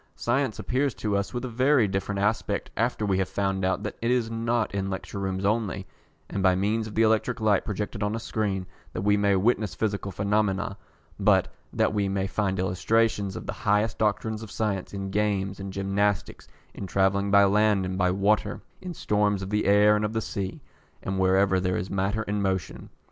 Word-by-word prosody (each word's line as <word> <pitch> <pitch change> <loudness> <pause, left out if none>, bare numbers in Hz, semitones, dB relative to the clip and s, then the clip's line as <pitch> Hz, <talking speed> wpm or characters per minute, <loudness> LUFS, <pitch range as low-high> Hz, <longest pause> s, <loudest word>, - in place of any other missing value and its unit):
Science 125 -1 0
appears 130 -2 -1
to 100 +2 -1
us 100 0 -1
with 120 +1 -4
a - - -2
very 130 0 +3
different 95 +1 -2
aspect 105 +3 -1
after 115 -1 0
we 95 -2 +1
have 95 - 0
found 95 -1 -1
out 95 0 0
that - - -5
it 115 - 0
is 120 -2 +1
not 115 -1 -1
in 95 -1 -2
lecture 95 +1 -5
rooms 95 0 -2
only, 100 -3 0 0.4
and 100 - -3
by 95 -1 +4
means 110 +4 0
of 105 - -9
the 115 - +4
electric 110 +2 +2
light 105 -3 +2
projected 105 0 -4
on 105 +1 0
a - - -3
screen, 105 -4 -2 0.3
that 90 - -3
we 105 0 +4
may 100 -1 +3
witness 105 +1 +1
physical 100 -2 -2
phenomena, 100 0 0 0.4
but - - +3 0.2
that - - +1
we 100 -2 0
may 95 0 -1
find 95 -1 -1
illustrations 95 +2 +1
of - - -6
the - - -3
highest 105 0 0
doctrines 110 0 0
of 110 - -8
science 100 -4 -2
in 95 -1 -5
games 100 -2 0
and 95 0 -5
gymnastics, 100 0 -1 0.3
in 100 - -6
travelling 100 +2 +1
by 100 0 +6
land 105 -1 +3
and 95 0 -3
by 90 0 +3
water, 100 +3 +1 0.2
in 180 -2 -6
storms 105 -4 +1
of 95 - -6
the 105 0 +1
air 105 +1 +5
and 105 - 0
of 105 +1 -1
the 110 - 0
sea, 95 -3 -4 0.4
and 95 0 -2
wherever 95 0 +3
there 90 0 0
is 95 - -4
matter 100 +3 0
in 105 -1 -2
motion. 95 -4 -2
100 Hz, 200 wpm, -26 LUFS, 95-110 Hz, 0.4 s, by